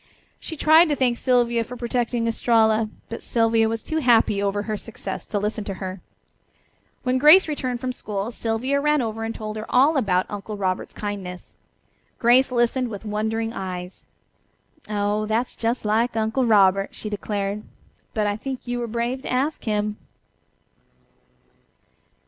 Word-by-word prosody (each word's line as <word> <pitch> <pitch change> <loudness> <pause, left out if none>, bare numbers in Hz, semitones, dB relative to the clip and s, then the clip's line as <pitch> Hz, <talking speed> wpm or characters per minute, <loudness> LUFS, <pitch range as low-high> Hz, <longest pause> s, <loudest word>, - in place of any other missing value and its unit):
She 320 - -7
tried 315 +3 +6
to 295 - +2
thank 250 -3 +1
Sylvia 240 -2 +2
for 245 +2 -9
protecting 240 -1 -1
Estralla, 225 -1 +2 0.2
but 230 - -6
Sylvia 225 -1 +2
was 225 0 -3
too 315 - -3
happy 235 -7 +3
over 200 0 0
her 215 0 -3
success 205 -3 -6
to 210 - -2
listen 210 +1 -2
to 195 - -4
her. 185 -1 -6 1.0
When 255 0 +1
Grace 310 +7 +8
returned 255 -5 -2
from 255 +1 -3
school 210 -1 -4
Sylvia 240 +5 -1
ran 300 -2 +2
over 225 0 -4
and 225 0 -4
told 215 0 -5
her 215 - -5
all 280 +5 +4
about 185 -7 +2
her - - -16
Uncle 205 +1 -6
Robert's 185 -2 -2
kindness. 195 -3 -6 0.6
Grace 250 +2 +4
listened 245 +1 +1
with 210 0 -8
wondering 220 +2 -2
eyes. 180 -3 -6 0.9
"Oh, 210 0 0
that's 225 +3 -1
just 230 0 -2
like 225 +3 +1
Uncle 225 +3 +1
Robert," 195 -2 +4
she - - -6
declared. 205 0 -3 0.5
"But 215 -1 +1
I 205 0 0
think 260 +2 -6
you 245 0 -2
were 240 - -3
brave 235 +3 -2
to - - -6
ask 275 +5 -1
him." 210 -1 -1
225 Hz, 160 wpm, -23 LUFS, 210-250 Hz, 1.0 s, Grace